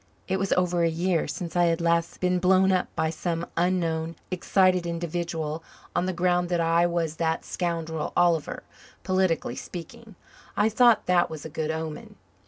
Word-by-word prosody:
It 190 0 0
was 195 0 -1
over 180 -1 +1
a 165 - +3
year 170 +1 0
since 170 +3 -5
I 175 0 +4
had 165 0 +1
last 170 0 0
been 180 0 +1
blown 190 +1 +4
up 185 -1 +1
by 160 - 0
some 165 +1 -3
unknown, 165 -2 0 0.2
excited 185 -1 +2
individual 165 -2 -3 0.3
on 180 - +1
the - - 0
ground 180 0 +1
that 175 -1 +1
I 165 +1 +3
was 165 -2 -2
that 160 0 -1
scoundrel 165 -3 -3
Oliver 170 -4 +2 0.4
politically 185 -9 0
speaking. 210 - -9 0.4
I 210 +2 +4
thought 225 -1 +4
that 180 -1 +3
was 155 -1 -8
a - - -5
good 155 +1 -3
omen. 160 -1 -5
170 Hz, 170 wpm, -26 LUFS, 165-185 Hz, 0.4 s, I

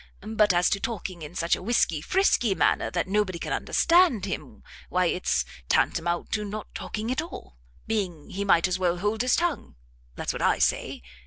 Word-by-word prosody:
But 210 -2 +5
as 175 0 +3
to 200 - +1
talking 190 -6 -5
in 155 +3 -9
such 170 0 +1
a - - -9
whisky 185 -7 +1
frisky 245 - +2
manner - - +2
that 175 0 -2
nobody 195 -2 0
can - - -4
understand 335 - +3
him, 195 - -6 0.3
why 180 0 +2
its 180 +1 0 0.2
tantamount 170 +1 +1
to 210 - 0
not 210 +1 -7
talking 220 +3 -4
at 260 - 0
all, 185 - -10 0.3
being 185 -9 -3
he 200 +2 -3
might 180 -3 +4
as 185 0 -1
well 180 -1 +1
hold 210 +4 -1
his 250 0 +3
tongue. 345 - -2 0.4
That's - - -3
what - - -5
I - - +3
say. - - 0
195 Hz, 185 wpm, -26 LUFS, 175-220 Hz, 0.4 s, But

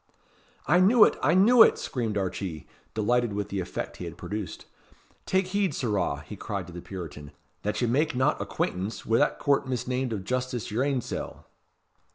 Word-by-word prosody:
"I 175 +6 +4
knew 210 +5 +7
it! - - +4
I 150 +6 +3
knew 225 +6 +6
it!" - - +7
screamed 115 -5 -3
Archee, 95 -5 -3 0.3
delighted 120 +1 +1
with 100 0 -3
the 100 - -2
effect 90 - -5
he - - -6
had - - -8
produced. 105 -2 -6 0.6
"Take 190 0 +1
heed, 195 -6 0
sirrah," 100 - -1
he 105 - -8
cried 100 -1 -4
to 85 - -11
the 85 - -7
Puritan, 80 -7 -8 0.3
"that 105 - -2
ye - - +2
make 150 +6 +1
not 130 +1 +1
acquaintance 95 +5 -3
wi' 115 +1 +3
'that 145 - +2
Court 140 -1 +1
misnamed 125 0 -2
of 105 -4 -3
justice' 125 +1 -2
yer 115 +4 0
ain 135 -2 +1
sell." - - -6
120 Hz, 185 wpm, -27 LUFS, 100-140 Hz, 0.6 s, knew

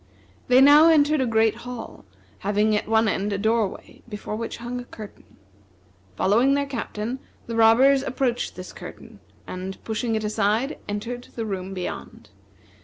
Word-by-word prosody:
They 250 +1 +6
now 295 +4 +8
entered 305 -2 +4
a 255 - +1
great 220 -1 +2
hall, 240 - -8 0.3
having 210 +2 +1
at 210 - -2
one 225 0 +3
end 205 0 -1
a - - -1
doorway 220 0 -1
before 210 0 -5
which 230 +1 -5
hung 240 +1 -5
a - - -6
curtain. 215 -3 -12 0.8
Following 230 - +3
their 285 0 0
Captain, 240 -2 -4 0.3
the 230 - -5
robbers 245 +5 +5
approached 260 -2 -2
this 185 0 -9
curtain, - - -11 0.3
and 185 +1 -6
pushing 225 +1 -2
it 220 - -2
aside, 215 +5 0
entered 235 +4 -5
the 230 - -3
room 195 -2 -4
beyond. 180 -1 -7
225 Hz, 155 wpm, -24 LUFS, 210-250 Hz, 0.8 s, now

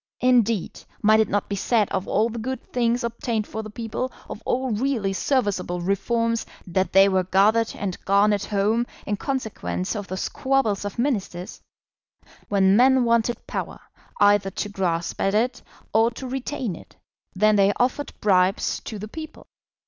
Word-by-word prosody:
Indeed, 230 -6 +2 0.2
might 215 +1 +5
it 220 - +2
not 205 0 0
be 200 - -3
said 210 +1 +2
of 190 0 -2
all 215 +2 +2
the 235 0 -5
good 260 +2 -6
things 240 0 +1
obtained 230 -2 -2
for 220 - -5
the 215 - -8
people, 230 +4 -4 0.2
of 210 - -8
all 260 0 0
really 220 -3 0
serviceable 205 -5 0
reforms, 230 +5 0 0.2
that 190 +1 -1
they 195 +1 +7
were 190 -1 +2
gathered 215 +5 +3
and 190 -3 -5
garnered 200 +1 +3
home 215 +4 +1 0.2
in 205 - -1
consequence 220 -6 -3
of 205 -2 -5
the 185 - -4
squabbles 230 -4 0
of 205 - -5
Ministers? 205 -8 -2 0.9
When 195 -1 +4
men 260 +2 +5
wanted 235 0 +1
power, - - -5 0.4
either 205 -1 +4
to 205 +2 -4
grasp 175 -4 -2
at 195 +1 +1
it 245 +3 0 0.3
or 225 +1 +4
to 240 +3 -9
retain 255 - -3
it, - - -15 0.4
then 215 +2 +4
they 200 0 +4
offered 255 +4 0
bribes 190 -1 +2
to 220 - -5
the 210 +1 -6
people. 315 +7 -9
215 Hz, 165 wpm, -24 LUFS, 195-240 Hz, 0.9 s, they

